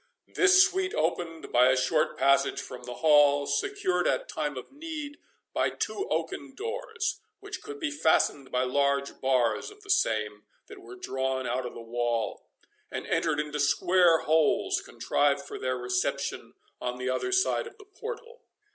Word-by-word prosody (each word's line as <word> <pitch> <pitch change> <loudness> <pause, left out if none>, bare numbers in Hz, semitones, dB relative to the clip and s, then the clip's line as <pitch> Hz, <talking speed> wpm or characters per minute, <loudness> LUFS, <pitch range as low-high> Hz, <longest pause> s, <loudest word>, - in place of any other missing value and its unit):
This 380 -1 +6
suite 380 -1 0
opened 165 0 -2
by 125 +1 +5
a 130 0 +4
short 140 +5 +1
passage 140 +1 +3
from 125 - -8
the 125 - -6
hall, 145 -2 +6
secured 180 - 0
at - - 0
time 150 -3 -3
of 130 - -8
need 300 -1 -7 0.3
by - - +1
two 395 +1 -3
oaken 285 -9 -3
doors, 455 - -3 0.2
which - - -7
could 430 0 -8
be 315 -3 -2
fastened 160 - +1
by 125 0 +1
large 140 +1 0
bars 125 -4 +1
of 415 0 -16
the 405 - -3
same, 105 - +1 0.2
that - - -12
were 120 +2 -11
drawn 130 +1 -2
out 125 +1 -1
of - - -10
the - - -8
wall, 120 0 -2 0.4
and - - -5
entered 160 -3 0
into 150 -1 -3
square 170 +3 +4
holes, 155 0 +2
contrived 140 -1 0
for - - -7
their 130 0 -1
reception 125 0 -2 0.3
on 125 0 -3
the 125 0 -2
other 375 - -2
side 380 +4 +2
of 455 - -13
the 410 - -15
portal. 470 +4 -8
150 Hz, 165 wpm, -28 LUFS, -, 0.4 s, This